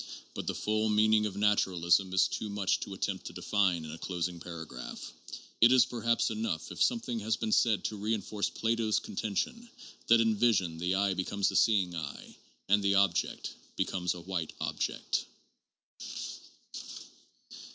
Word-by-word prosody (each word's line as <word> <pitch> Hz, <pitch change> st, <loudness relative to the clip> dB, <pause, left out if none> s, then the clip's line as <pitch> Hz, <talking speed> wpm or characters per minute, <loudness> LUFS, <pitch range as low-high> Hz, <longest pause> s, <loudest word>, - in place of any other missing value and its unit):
But -, -, -5 dB
the -, -, -1 dB
full 110 Hz, +1 st, 0 dB
meaning 105 Hz, 0 st, +4 dB
of 100 Hz, -, -7 dB
naturalism 95 Hz, -3 st, +3 dB
is 95 Hz, -, +4 dB
too 110 Hz, -, -4 dB
much 100 Hz, -1 st, 0 dB
to 95 Hz, -, -6 dB
attempt 95 Hz, -1 st, -3 dB
to -, -, -8 dB
define 90 Hz, -6 st, +1 dB
in 75 Hz, -, -7 dB
a 80 Hz, -, -8 dB
closing 90 Hz, -1 st, -3 dB
paragraph. 85 Hz, -2 st, -8 dB, 0.5 s
It 115 Hz, +2 st, +8 dB
is 130 Hz, -1 st, +6 dB
per 120 Hz, -2 st, -6 dB
haps 115 Hz, +1 st, +2 dB
enough 105 Hz, -7 st, -3 dB
if -, -, -7 dB
something 230 Hz, -, +1 dB
has 110 Hz, +1 st, 0 dB
been 110 Hz, -, -2 dB
said 110 Hz, -1 st, +3 dB
to 105 Hz, -, -3 dB
reinforce 105 Hz, 0 st, -1 dB
Plato's 115 Hz, -1 st, 0 dB
con -, -, -5 dB
tention 235 Hz, -, -2 dB, 0.4 s
that 115 Hz, 0 st, +6 dB
in 115 Hz, -1 st, +3 dB
vision 95 Hz, -8 st, +2 dB
the 90 Hz, +2 st, 0 dB
eye 100 Hz, 0 st, +2 dB
becomes 95 Hz, +2 st, 0 dB
a -, -, -6 dB
seeing 95 Hz, -6 st, +3 dB
eye, 75 Hz, -3 st, -7 dB, 0.3 s
and 105 Hz, +1 st, +4 dB
the 100 Hz, 0 st, +3 dB
object 100 Hz, -3 st, +1 dB, 0.2 s
becomes 90 Hz, -1 st, -1 dB
a 90 Hz, -, -8 dB
white 85 Hz, -3 st, -3 dB
object. -, -, -2 dB
100 Hz, 160 wpm, -31 LUFS, 90-110 Hz, 0.5 s, It